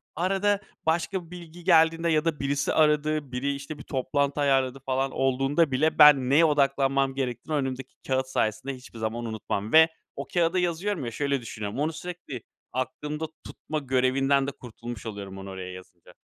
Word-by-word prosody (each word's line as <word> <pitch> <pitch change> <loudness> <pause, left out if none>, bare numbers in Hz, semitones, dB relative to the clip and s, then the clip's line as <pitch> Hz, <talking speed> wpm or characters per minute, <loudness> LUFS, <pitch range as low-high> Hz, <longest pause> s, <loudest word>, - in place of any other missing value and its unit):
Arada 195 +4 +1 0.3
başka 170 +3 0
bir 165 - -19
bilgi 175 -1 -10
geldiğinde 165 -1 +4
ya 155 0 +2
da 160 -3 0
birisi 140 +1 0
aradı, 150 -2 +2
biri, 140 +3 -1
işte, 140 +2 -7
bir - - -10
toplantı 140 +2 -1
ayarladı 135 -1 +2
falan 135 0 0
olduğunda 135 +3 +1
bile 155 +5 +1
ben 140 -4 +8
neye 155 +4 +6
odaklanmam 135 -2 +2
gerektiğini 130 +3 -3
önümdeki 130 -1 -4
kâğıt 130 0 0
sayesinde 120 +2 -1
hiçbir 125 -3 -12
zaman 115 +2 -3
unutmam 110 0 -4
ve 160 0 +9 0.3
o - - -6
kâğıda 175 +1 +1
yazıyorum 175 -2 -1
ya, 115 - -4
şöyle 140 0 -1
düşünüyorum. 110 +1 -5
Onu 155 +2 0
sürekli 175 -9 -7 0.3
aklımda 150 +4 -3 0.2
tutma 155 0 -5
görevinden 135 +1 +2
de - - -2
kurtulmuş 120 -2 -9
oluyorum 100 -3 -6
onu 95 0 -8
oraya 95 -1 -6
yazınca. 90 -2 -14
140 Hz, 165 wpm, -26 LUFS, 130-160 Hz, 0.3 s, ve